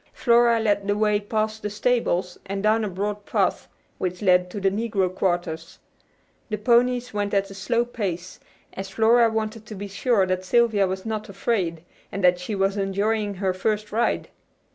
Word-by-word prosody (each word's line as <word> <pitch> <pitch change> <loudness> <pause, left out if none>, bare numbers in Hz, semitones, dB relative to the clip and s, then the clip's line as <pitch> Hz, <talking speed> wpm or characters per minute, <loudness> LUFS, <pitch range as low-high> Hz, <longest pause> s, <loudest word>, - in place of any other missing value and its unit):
Flora 235 -1 +4
led 205 -2 +1
the 205 0 +1
way 210 -1 +2
past 215 +1 -2
the 210 - -3
stables, 205 -5 0
and 195 +1 -3
down 220 +1 +3
a - - -1
broad 205 +2 -3
path - - 0 0.3
which 180 +1 -3
led 180 -1 +4
to 205 - -5
the 195 -1 +2
negro 200 -3 -1
quarters. 175 -3 -2 0.7
The 215 - -2
ponies 245 +2 +2
went 205 0 -1
at 195 0 0
a - - -7
slow 235 +5 0
pace, 185 -7 -5 0.3
as 195 0 -6
Flora 225 +3 +4
wanted 220 0 -3
to 215 - -7
be 200 +1 -6
sure 200 0 +1
that 185 0 -1
Sylvia 215 -1 +3
was 190 +2 -4
not 215 -1 -4
afraid, 190 -5 -1 0.3
and 195 0 -4
that 180 0 +4
she 205 +4 -4
was 195 +1 0
enjoying 205 +1 0
her 190 0 -1
first 210 +2 -2
ride. 225 +3 0
205 Hz, 180 wpm, -24 LUFS, 190-220 Hz, 0.7 s, Flora